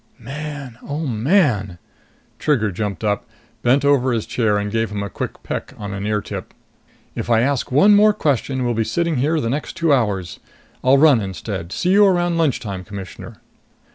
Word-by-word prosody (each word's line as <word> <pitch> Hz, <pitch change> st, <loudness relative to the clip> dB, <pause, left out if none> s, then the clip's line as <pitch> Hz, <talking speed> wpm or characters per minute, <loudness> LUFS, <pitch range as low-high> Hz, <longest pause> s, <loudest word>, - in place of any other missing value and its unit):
"Man, 140 Hz, -1 st, -7 dB
oh, 150 Hz, +3 st, -4 dB
man!" 115 Hz, -, +1 dB, 0.6 s
Trigger 115 Hz, -9 st, +1 dB
jumped 100 Hz, +1 st, -4 dB
up, 105 Hz, -2 st, -1 dB, 0.3 s
bent 135 Hz, +4 st, +3 dB
over 135 Hz, -3 st, +3 dB
his 115 Hz, -2 st, -1 dB
chair 110 Hz, -4 st, +1 dB
and 105 Hz, 0 st, -2 dB
gave 115 Hz, 0 st, 0 dB
him 105 Hz, -1 st, -3 dB
a 100 Hz, -, -6 dB
quick -, -, -6 dB
peck -, -, -5 dB
on 100 Hz, -1 st, -6 dB
an 100 Hz, +1 st, -4 dB
ear 105 Hz, -1 st, 0 dB
tip. -, -, -7 dB, 0.6 s
"If -, -, -5 dB
I 115 Hz, -1 st, +4 dB
ask 135 Hz, 0 st, 0 dB
one 195 Hz, +11 st, +6 dB
more 210 Hz, +1 st, +6 dB
question, 135 Hz, -, -1 dB
we'll 120 Hz, -, +1 dB
be 115 Hz, 0 st, 0 dB
sitting 170 Hz, +5 st, -1 dB
here 155 Hz, +5 st, +1 dB
the 115 Hz, -, -2 dB
next 140 Hz, +5 st, -3 dB
two 165 Hz, -3 st, +2 dB
hours. 100 Hz, -9 st, -1 dB, 0.4 s
I'll 130 Hz, +2 st, +5 dB
run 140 Hz, -5 st, +5 dB
instead! 95 Hz, -2 st, -5 dB
See 180 Hz, -, 0 dB
you 205 Hz, +1 st, +6 dB
around 175 Hz, -2 st, +1 dB
lunchtime, 105 Hz, -, -1 dB
Commissioner!" 100 Hz, -2 st, -9 dB
125 Hz, 180 wpm, -20 LUFS, 105-150 Hz, 0.6 s, one